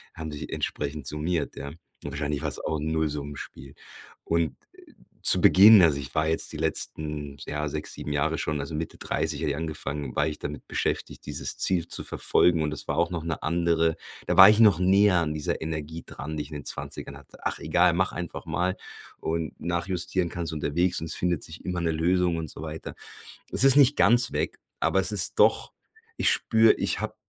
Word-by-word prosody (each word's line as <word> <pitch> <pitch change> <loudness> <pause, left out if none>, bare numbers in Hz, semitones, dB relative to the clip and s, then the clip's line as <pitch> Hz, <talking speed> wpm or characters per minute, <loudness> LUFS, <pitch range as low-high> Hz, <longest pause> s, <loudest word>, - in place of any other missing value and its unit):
haben 80 -1 -6
sich 75 - -7
entsprechend 75 -1 -4
summiert, 75 +2 -2
ja. 70 - -7 0.3
Wahrscheinlich 75 0 -3
war 75 - -1
es - - -7
auch 80 - -3
'n 80 +2 -3
Nullsummenspiel. 75 -3 -4 0.5
Und 85 -2 0 0.7
zu - - +6
Beginn 105 +1 +8
also, 80 -5 +4
ich 70 0 -8
war 80 0 +1
jetzt 80 - -2
die - - -5
letzten, 75 -2 -3
ja, 75 0 -3
6, 75 +1 -5
7 75 - -5
Jahre 80 +3 0
schon, 75 -1 -2
also, 75 +3 -6
Mitte 80 +1 -5
30 80 -2 -2
hatte 75 -3 0
ich 70 - -2
angefangen, 75 -4 -4
war 75 - +2
ich 75 - -5
damit 75 -1 -7
beschäftigt, - - -3
dieses - - -3
Ziel 90 -3 +1
zu - - +1
verfolgen 85 -3 +2
und 75 0 -2
es - - -5
war 70 - -2
auch 85 - +2
noch 85 -2 -4
'ne 85 -2 -4
andere 85 -1 +1 0.3
da - - 0
war 95 +1 +11
ich 105 - +4
noch 105 -7 +6
näher 95 +1 +4
an 80 -2 -1
dieser 75 0 -3
Energie 80 0 -5
dran, 75 +3 -7
die 75 - -2
ich - - -13
in 75 - -8
den 70 - -7
20ern 70 - -6
hatte. 70 - -17
„Ach - - -1
egal, - - +3
mach - - +1
einfach 85 -1 -6
mal 90 +1 -1 0.4
und 80 -2 -3
nachjustieren 85 +1 -1
kannst 85 -1 -4
unterwegs 85 +4 0
und 80 - -4
es - - -3
findet 90 -3 -1
sich 80 - -9
immer 90 -2 -2
'ne 80 - 0
Lösung.“ 85 +1 +1
Und 80 -2 -5
so - - -10
weiter. 80 0 -7 0.6
Es - - +3
ist 135 -1 +7
nicht 140 0 +5
ganz 120 +1 +4
weg, - - -2 0.2
aber - - +2
es - - -1
ist - - +1
doch - - +3 0.5
ich - - +4
spüre, 110 0 +4
ich - - -1
habe - - -4
80 Hz, 205 wpm, -26 LUFS, 75-85 Hz, 0.7 s, war